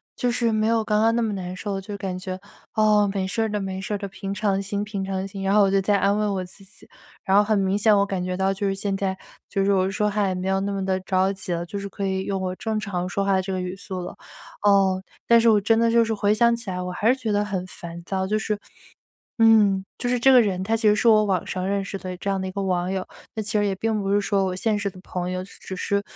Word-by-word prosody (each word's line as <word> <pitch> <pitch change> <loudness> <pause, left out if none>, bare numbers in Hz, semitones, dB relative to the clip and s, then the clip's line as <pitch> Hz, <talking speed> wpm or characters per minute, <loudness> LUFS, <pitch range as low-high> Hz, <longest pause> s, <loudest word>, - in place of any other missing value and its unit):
就 245 - 0
是 235 -1 +1
没 215 0 +1
有 225 -1 +2
刚 210 0 +1
刚 225 +1 +3
那 235 - +1
么 220 -2 0
难 185 -2 -5
受。 195 +1 -3
就 205 +2 -7
感 190 -2 -4
觉： 185 0 -5 0.4
“哦， 210 -2 +4
没 195 -2 -1
事 225 +4 -1
儿 220 - -1
的 210 0 -2
没 190 -1 -4
事 195 +2 -4
儿 - - 0
的， 200 0 -5
平 195 +1 -5
常 200 -2 0
心 200 +1 -3
平 200 -2 -4
常 190 0 -3
心。” 195 0 -7
然 195 - +2
后 210 - +6
我 195 -1 +4
就 195 - +3
在 200 +2 +2
安 200 +1 +2
慰 210 0 +1
我 190 -2 -1
自 185 +2 -14
己， 190 - -17 0.4
然 195 +1 +3
后 - - +8
很 215 0 +1
明 195 0 +1
显 215 0 +4
我 200 0 +3
感 190 -2 -3
觉 180 0 -2
到， 190 +1 +1
就 200 +1 -2
是 195 - 0
现 195 0 -2
在， 190 -1 -2 0.3
就 195 - 0
是 200 - +2
我 190 -1 +2
说 210 +2 0
话 205 -1 +1
也 185 - 0
没 185 +1 -2
有 190 0 +2
那 200 +1 -2
么 195 -1 -2
地 190 0 0
着 190 +1 +1
急 190 -2 -4
了， 170 0 -2
就 200 +3 -5
是 200 - -5
可 200 0 -5
以 190 0 -1
用 195 -1 -2
我 185 -1 -2
正 220 -1 -2
常 185 -4 -3
说 195 +2 -1
话 195 - +1
的 190 - +2
这 190 +1 -4
个 185 - -2
语 180 0 -4
速 190 -1 -6
了。 175 - -6 0.5
哦， 195 -2 +4 0.3
但 235 0 +7
是 230 - +3
我 210 -2 +4
真 225 +3 +3
的 230 0 +3
就 230 0 +4
是 225 0 -1
回 205 -1 +2
想 235 +2 +4
起 230 -3 -5
来， 180 0 -3
我 180 - -4
还 205 +4 -1
是 250 - +5
觉 225 -5 -2
得 205 0 +1
很 190 -3 -3
烦 170 -1 -9
躁， 190 +1 -2
就 210 +3 0
是 215 -1 -2 0.8
嗯， 210 -4 +5
就 245 - -2
是 245 0 +1
这 265 +3 +5
个 250 - +8
人， 190 -4 -1
他 225 +3 +1
其 220 -1 +2
实 210 - +4
是 215 - 0
我 215 -2 +6
网 190 -4 0
上 185 -1 -3
认 200 0 0
识 195 - -5
的 185 -1 -6
这 190 - -6
样 195 -1 0
的 190 - -3
一 - - -4
个 200 - -4
网 185 -1 0
友。 190 -1 -2 0.3
那 220 - -1
其 215 +2 -4
实 205 - +2
也 200 - 0
并 220 +2 -1
不 195 0 -1
是 205 - +3
说 200 -1 +1
我 185 -1 -2
现 215 +3 0
实 200 -1 -2
的 185 - -15
朋 180 -1 -4
友， 185 0 -3
只 195 - -15
只 190 - -7
是 200 +2 0
195 Hz, 330 characters per minute, -24 LUFS, 190-210 Hz, 0.8 s, 后